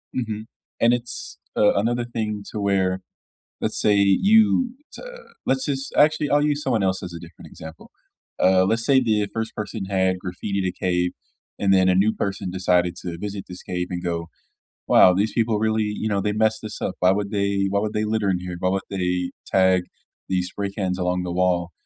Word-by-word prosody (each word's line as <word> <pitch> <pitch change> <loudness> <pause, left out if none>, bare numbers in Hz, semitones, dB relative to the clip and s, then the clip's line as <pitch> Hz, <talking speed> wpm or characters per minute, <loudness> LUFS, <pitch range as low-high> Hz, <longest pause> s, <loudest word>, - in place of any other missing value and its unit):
Mhm, 110 -3 -3 0.3
and 115 +1 +4
it's, 120 -1 -4 0.2
uh, 105 - +4
another 120 +4 0
thing 110 -3 -3
to 105 - -4
where, 95 -2 +1 0.6
let's - - 0
say, 105 -1 +3
you, 220 - +4 0.2
to - - -9 0.4
let's 130 0 +1
just 135 -1 -3
Actually, 150 0 +3
I'll 145 0 +3
use 150 0 0
someone 120 -7 +1
else 95 -1 0
as 90 -2 -6
a 85 - -8
different 85 -1 -13
example. 80 0 -12 0.5
Uh, 95 0 +4
let's 115 +4 +1
say 135 +1 +4
the 110 -4 +1
1st 110 0 -3
person 105 -1 -5
had 95 -1 +1
graffitied 95 +1 -2
cave, 90 -1 0 0.5
and 100 -1 +2
then 95 -1 +4
a 90 - +4
new 100 +4 +3
person 95 -2 -3
decided 90 -1 +1
to 85 -2 -6
visit 100 0 -5
this 90 - -8
cave 90 -1 -3
and 90 -1 -4
go, 85 -2 -3 0.6
"Wow, 90 - +7
these 100 +4 0
people 115 -2 +1
really 110 0 +1
you 105 +1 -3
know, 100 -2 0
they 105 +1 -1
messed 110 +1 +1
this 110 -1 -7
up. 95 - -2
Why 90 +1 +4
would 100 +1 -2
they 100 -1 0
why 100 +1 +1
would 105 +1 -2
they 105 - 0
litter 105 -2 0
in 90 -2 +1
here? 90 -1 -6
Why 90 - +1
would 95 +1 -1
they 90 -2 -1 0.2
tag 95 -1 +3 0.5
these 90 -1 0
spray 100 +1 -4
cans 95 -2 -2
along 90 0 0
the 90 - -4
wall?" 90 -1 +1
100 Hz, 200 wpm, -23 LUFS, 90-110 Hz, 0.6 s, Wow